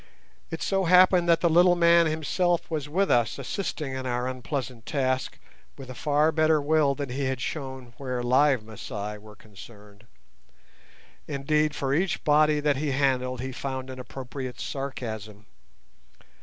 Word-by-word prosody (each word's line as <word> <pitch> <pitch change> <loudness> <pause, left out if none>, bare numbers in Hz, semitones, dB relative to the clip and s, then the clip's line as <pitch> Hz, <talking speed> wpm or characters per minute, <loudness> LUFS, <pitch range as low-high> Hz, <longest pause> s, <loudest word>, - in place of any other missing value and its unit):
It 165 - -5
so 195 -1 0
happened 180 0 +5
that 165 - +4
the 175 - +4
little 175 +2 +5
man 170 -1 +5
himself 165 +3 0
was 150 -3 -3
with 195 +6 +1
us 120 -2 +2
assisting 145 0 -4
in 130 0 -4
our 125 0 -1
unpleasant 130 -2 -5
task 130 -3 -1 0.4
with 130 -2 -9
a - - -6
far 150 +4 +2
better 155 0 +3
will 145 -1 +2
than 145 -2 -5
he 135 +2 -2
had 130 -1 -2
shown 130 -3 -6
where 125 -3 -3
live 130 0 +3
Masai 105 -1 -7
were 105 0 -14
concerned. 105 0 -15 1.2
Indeed, 150 +1 0
for 135 -1 -1
each 175 +4 0
body 150 0 +4
that 145 -2 +1
he 145 -1 -1
handled 130 -2 0
he 130 +1 -4
found 130 0 -5
an 130 - -9
appropriate 130 0 -7
sarcasm. 110 -6 -6
135 Hz, 155 wpm, -26 LUFS, 125-155 Hz, 1.2 s, happened